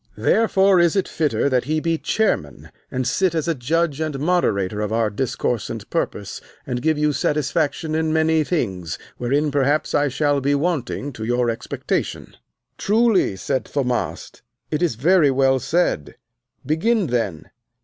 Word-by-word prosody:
Therefore 195 -4 +3
is 170 0 +3
it 195 - +1
fitter 155 -3 0
that 130 -3 +1
he 155 +1 0
be 165 0 -1
chairman, 75 - -1 0.2
and 130 0 -2
sit 180 +6 +1
as 160 -1 -1
a 165 - +2
judge 155 +3 -1
and 155 -3 -2
moderator 110 - 0
of 105 0 -2
our 110 -1 +1
discourse 120 0 -2
and - - -6
purpose, 100 -1 -3 0.2
and 125 -4 -3
give 155 +2 +1
you 150 0 +1
satisfaction 150 +2 -1
in 160 0 0
many 160 0 +2
things 95 - -2 0.2
wherein 145 +5 +1
perhaps 145 +2 +1
I 145 - +3
shall 145 +1 +1
be 140 +2 +2
wanting 145 -3 -2
to 110 - -7
your 120 +1 +1
expectation. 115 - -4 0.4
Truly, 215 - +2
said 130 +7 -2
Thaumast, 125 -4 -3 0.3
it 150 - -1
is 170 -9 +1
very 160 - +4
well 135 0 +3
said; 135 - 0 0.5
begin 200 - +1
then. 115 - -2
145 Hz, 155 wpm, -21 LUFS, 125-165 Hz, 0.5 s, very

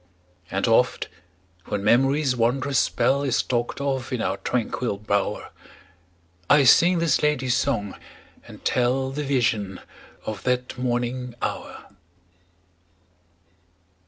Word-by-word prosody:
And - - -1
oft - - +2 0.6
when 100 -1 -3
memory's 135 +4 +3
wondrous 130 +4 +1
spell 140 +1 +1
Is 135 -3 +1
talked 120 0 -2
of 135 -3 -2
in 125 - -1
our 100 -3 -1
tranquil 115 +1 -2
bower, 100 -1 -2 1.0
I 145 -1 +6
sing 175 +7 +6
this 165 -2 +2
lady's 140 -4 +1
song, 115 -8 -1 0.5
and - - -13
tell 130 +2 +1
The 150 +2 -3
vision 115 -8 0 0.5
of 110 -2 -5
that 125 0 -1
morning 125 0 -2
hour. - - -5
125 Hz, 110 wpm, -24 LUFS, 120-135 Hz, 1.0 s, I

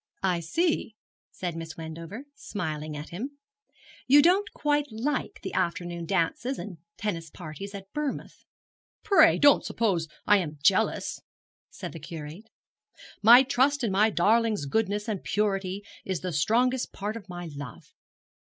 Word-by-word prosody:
'I 180 -2 +2
see,' 265 - 0 0.3
said 175 -3 -5
Miss 165 -1 -7
Wendover, 165 - -7
smiling 155 - -5
at 145 - -7
him; 260 +11 -6 0.7
'you 285 +2 +7
don't 375 +5 +3
quite 295 0 0
like 245 +7 -2
the - - -5
afternoon 170 -1 -2
dances 195 +9 0
and 190 -5 -7 0.2
tennis 170 -6 -3
parties 180 +6 -8
at 195 -1 -7
Bournemouth.' 300 -2 -4 0.6
'Pray 330 -6 +6
don't 285 -1 +6
suppose 190 -8 0 0.2
I 205 -1 +6
am 155 -4 -4
jealous,' - - +2 0.5
said - - -7
the 165 - -8
Curate. 160 +7 -8 0.7
'My 240 +4 +9
trust 270 +2 +2
in 225 - +1
my 210 +3 +4
darling's 215 -2 +2
goodness 205 +6 0
and 210 -4 -3
purity 195 -1 -1 0.2
is 185 -3 -3
the 180 -2 -3
strongest 245 - +2
part 205 +2 -4
of 205 -4 -9
my 175 -1 -6
love. 140 -5 -9
200 Hz, 145 wpm, -27 LUFS, 170-245 Hz, 0.7 s, My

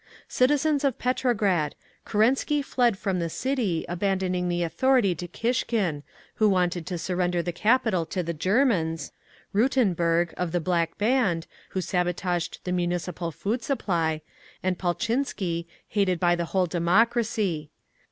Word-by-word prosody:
"Citizens 290 +3 +2
of 275 -4 +1
Petrograd! 215 - +1 0.3
Kerensky 265 +7 +2
fled 240 -7 +2
from 190 -2 -1
the 170 -1 -1
city, 235 - -1
abandoning 185 0 -1
the 175 0 0
authority 245 +2 +2
to 175 +1 -6
Kishkin, 215 - -1 0.4
who 215 -1 +4
wanted 180 -3 0
to 180 - -3
surrender 175 0 0
the 175 - -2
capital 210 -3 +2
to 180 +2 -2
the 170 0 -3
Germans; 170 - +1 0.4
Rutenburg, 175 -8 +2
of 180 -2 -2
the 175 - +2
Black 170 -1 0
Band, 210 -7 +1 0.3
who - - +2
sabotaged 180 -1 -1
the 180 - -3
Municipal 175 -1 -2
Food 210 - -2
Supply; 170 - -1 0.4
and 185 -1 0
Paltchinsky, 185 -3 -1 0.2
hated 190 -4 +1
by 175 0 +3
the 170 0 -2
whole 185 +2 +1
democracy. 185 -1 +1
185 Hz, 130 wpm, -26 LUFS, 170-230 Hz, 0.4 s, who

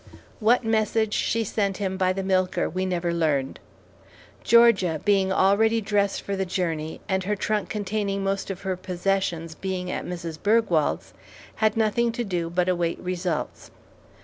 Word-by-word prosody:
What 235 +3 +3
message 220 -1 +1
she 230 0 +1
sent 200 -2 -1
him 190 -2 -2
by 185 -1 +2
the 195 +1 -3
milker 185 -1 +1
we 185 +2 -2
never 175 -1 -1
learned. 150 -5 0 0.8
Georgia, 205 -9 +5
being 195 -2 +3
already 210 +4 +3
dressed 200 -2 0
for 200 - -3
the 195 - -1
journey, 165 -4 -3
and 190 -2 -1
her 210 +2 0
trunk 210 0 -1
containing 200 -1 -2
most 195 0 -2
of 195 -1 -6
her 190 -1 -1
possessions 180 -2 -2
being 185 +2 -4
at - - -3
Mrs. 170 -3 -6
Bergwald's, 205 -8 +1 0.4
had 215 0 +2
nothing 225 +2 +2
to 240 - -2
do 175 -5 -2
but 175 +1 0
await 175 -2 0
results. 180 -3 -3
190 Hz, 155 wpm, -25 LUFS, 180-210 Hz, 0.8 s, Georgia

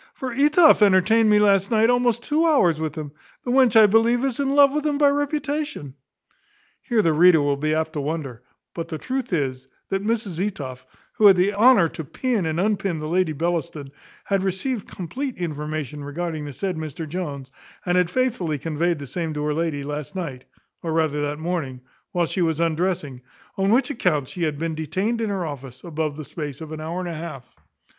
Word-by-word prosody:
for 260 -1 -5
Etoff 300 +2 +5
entertained 210 +3 +4
me 210 - +5
last 200 -2 +3
night 225 +1 +3
almost 245 -1 +1
two 305 +4 +1
hours 180 - +3
with 155 -2 -3
him. 150 -3 -6 0.3
The 245 - -2
wench 250 -3 +5
I 215 - +8
believe 230 +4 +3
is 265 -2 -2
in 275 0 0
love 280 -1 +6
with 300 0 -1
him 295 -2 0
by 290 -1 +5
reputation." 290 - -2 0.9
Here 230 -4 +1
the 165 - +3
reader 170 +1 +6
will 145 -1 +1
be 155 +2 -1
apt 160 0 -1
to 150 - -2
wonder; 140 -5 -4 0.3
but 165 -1 -5
the 160 -2 -5
truth 255 +5 -4
is, 130 -5 -2 0.2
that 195 0 -1
Mrs 210 -6 -1
Etoff, 135 -11 -5 0.3
who 215 - +5
had 195 - +8
the 190 +3 +2
honour 215 -3 +5
to 160 - -7
pin 220 - -1
and 160 +1 -1
unpin 195 -3 0
the 155 0 -5
Lady 180 0 +1
Bellaston, 155 -3 -3 0.3
had 195 -1 0
received 195 +5 -2
compleat 250 - -5
information 150 -3 -4
concerning 155 +1 -4
the 145 - -7
said 185 +5 -3
Mr 160 +1 -6
Jones, 145 -6 -5 0.3
and 180 -1 +1
had 180 -2 +3
faithfully 215 - -1
conveyed 165 +3 -1
the 145 - -7
same 160 +2 -4
to 150 - -2
her 150 0 0
lady 155 -3 -2
last 150 +3 -6
night 140 -9 -5 0.4
(or 165 - -3
rather 155 -2 +1
that 145 0 -2
morning) 155 -6 -3 0.3
while 175 -1 +1
she 185 - -3
was 160 -2 +1
undressing; 165 -5 -1 0.3
on 195 0 +1
which 255 +6 +3
accounts 150 - 0
she 180 - -7
had 150 -2 -2
been 165 +1 -2
detained 190 - -2
in 220 - -1
her 190 -3 -2
office 135 -4 -8
above 155 -3 -3
the 155 - -7
space 145 -4 -6
of 160 -1 -8
an 155 0 -6
hour 165 +3 -4
and 180 - -4
a - - -4
half. 155 -5 -7
170 Hz, 205 wpm, -23 LUFS, 150-215 Hz, 0.9 s, I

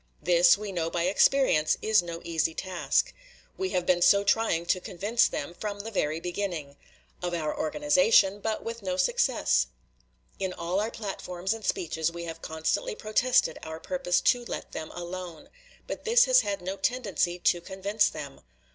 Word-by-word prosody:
This, 175 +1 +5
we 210 -1 -6
know 165 -3 -2
by 170 0 -1
experience, 185 - +3
is 215 -2 +3
no 170 -1 -7
easy 165 -1 -1
task. 185 -2 0 0.4
We 380 0 -2
have 180 - -1
been 175 -1 +2
so 200 +3 +5
trying 200 -5 +1
to 185 - +1
convince 205 +6 +1
them 145 +4 -5
from 205 +2 -5
the 225 +2 -7
very 155 -5 -1
beginning; 175 -5 -4 0.5
of 175 -1 -2
our 155 -2 -2
organization, 230 - +3
but 220 +1 -3
with 230 0 -6
no 185 -2 -3
success. - - +2 0.7
In 190 -1 -2
all 175 +2 -2
our 215 +2 -1
platforms 190 -3 -4
and 225 -1 -8
speeches 160 -3 -1
we 170 0 -7
have 165 -1 -7
constantly 160 - -2
protested 245 - +1
our 160 0 -7
purpose 265 -5 0
to 245 -1 +2
let - - -6
them 155 - -6
alone; 175 -2 -7 0.4
but - - -6
this 480 +2 +5
has - - +5
had 200 -3 -3
no 190 +2 -4
tendency 195 -6 -1
to 175 -1 +1
convince 195 +3 0
them. 140 -2 -8
185 Hz, 170 wpm, -27 LUFS, 170-215 Hz, 0.7 s, This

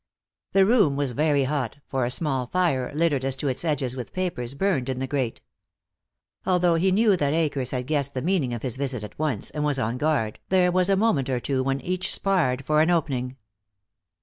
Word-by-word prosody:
The 195 -1 +5
room 205 - +4
was 140 -2 0
very 145 +2 +2
hot, 135 -2 -2
for 130 -2 -1
a - - -1
small 130 -2 -1
fire, 140 -7 0
littered 150 -4 +1
as 135 0 0
to 135 +2 -3
its 130 +4 -3
edges 135 -6 -1
with 125 -2 -7
papers, 140 -9 -3
burned 145 -7 0
in 130 - -2
the 130 - -2
grate. 130 -4 -2 1.0
Although 180 -2 +2
he 180 +3 +2
knew 210 +1 +4
that 145 -3 0
Akers 145 -6 0
had 125 -1 -3
guessed 140 -1 -1
the 130 - -2
meaning 170 -7 +1
of 120 -2 -5
his 130 -2 -1
visit 130 -5 -3
at 105 - -10
once 150 -9 -1
and 150 - -3
was 145 -2 +1
on 120 0 -2
guard, 140 -8 0
there 180 -1 +3
was 180 +1 +2
a 195 - +4
moment 190 - +1
or 130 -2 0
two 130 +1 -1
when 135 +1 -1
each 185 +1 -2
sparred 145 -10 0
for 155 +1 +3
an 160 - +3
opening. 135 -7 -1
140 Hz, 210 wpm, -25 LUFS, 130-175 Hz, 1.0 s, The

